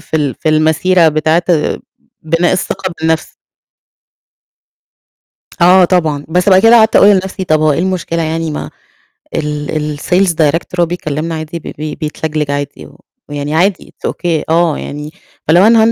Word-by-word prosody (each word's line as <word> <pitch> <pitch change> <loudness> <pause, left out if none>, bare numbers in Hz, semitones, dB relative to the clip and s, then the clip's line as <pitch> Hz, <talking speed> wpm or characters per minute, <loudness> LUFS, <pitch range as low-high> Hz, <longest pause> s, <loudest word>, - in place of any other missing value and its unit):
في 160 - -4
ال 145 -4 -1
في 155 - -3
المسيرة 160 +3 +3
بتاعة 155 +3 +1 0.8
بناء 165 +2 +1
الثقة 185 0 -3
بالنَفْس. 160 0 -1 2.3
آه 180 +1 +6
طبعًا، 160 -5 0
بس 180 +4 +1
بقى 190 -1 +6
كده 225 +2 +6
قعدت 220 -1 +4
أقول 200 - +6
لنَفْسي 190 -1 +1
طَب 155 -3 +1
هو 155 -1 +3
إيه - - -2
المشكلة 175 -2 -2
يعني 160 0 -2
ما 150 - -5 0.7
ال 150 0 -3
الsales 185 +4 +1
director 165 +3 0
بيكلّمنا 165 -1 -3
عادي 160 +2 -6
ب - - -22
بب 150 0 -5
بيتلجلج 155 -1 -3
عادي، 145 0 -5
و - - -16 0.3
يعني 145 +1 -4
عادي 185 +3 0
It's - - +1
OK 165 -3 -2
آه، 165 -1 +2
يعني 150 +1 -7 0.4
فلو 175 +5 +5
أنا 230 0 +5
160 Hz, 150 wpm, -13 LUFS, 155-180 Hz, 2.3 s, آه